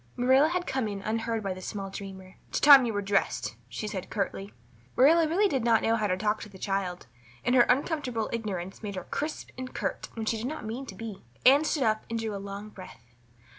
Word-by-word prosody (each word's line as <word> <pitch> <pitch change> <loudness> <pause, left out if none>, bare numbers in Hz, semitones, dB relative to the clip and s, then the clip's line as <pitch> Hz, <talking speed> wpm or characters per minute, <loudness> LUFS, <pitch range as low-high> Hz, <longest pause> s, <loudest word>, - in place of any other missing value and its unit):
Marilla 260 +5 +5
had 360 +1 -1
come 260 -4 -1
in 200 -1 -5
unheard 225 0 -1
by 195 -1 -1
the 185 - -9
small 195 0 -5
dreamer. 190 -1 -9
"It's - - -1
time 275 -4 +9
you 225 - -2
were 205 0 -1
dressed," 195 0 0
she 215 - -5
said 195 -3 -5
curtly. 195 -1 -3 0.4
Marilla 320 +5 +6
really 380 +7 +3
did 270 - -1
not 230 -2 +3
know 225 - +3
how 215 -2 0
to 185 -1 0
talk 210 +2 0
to 210 - -8
the 195 - -13
child, 190 -2 -2 0.4
and 245 - +2
her 245 -2 +6
uncomfortable 255 -4 0
ignorance 195 -5 -4
made 205 -2 -5
her 185 - -4
crisp 300 +2 -4
and 255 0 -5
curt - - -3
when 225 -1 -4
she 225 - 0
did 225 +3 -3
not 310 -4 -5
mean 245 +5 -5
to 195 - -8
be. 220 -1 -7 0.2
Anne 280 +4 +7
stood 300 -3 +1
up 215 -1 +1
and 230 - -2
drew 220 -2 -3
a 200 - -5
long 200 +1 -7
breath. 120 - -13
220 Hz, 230 wpm, -28 LUFS, 195-255 Hz, 0.4 s, time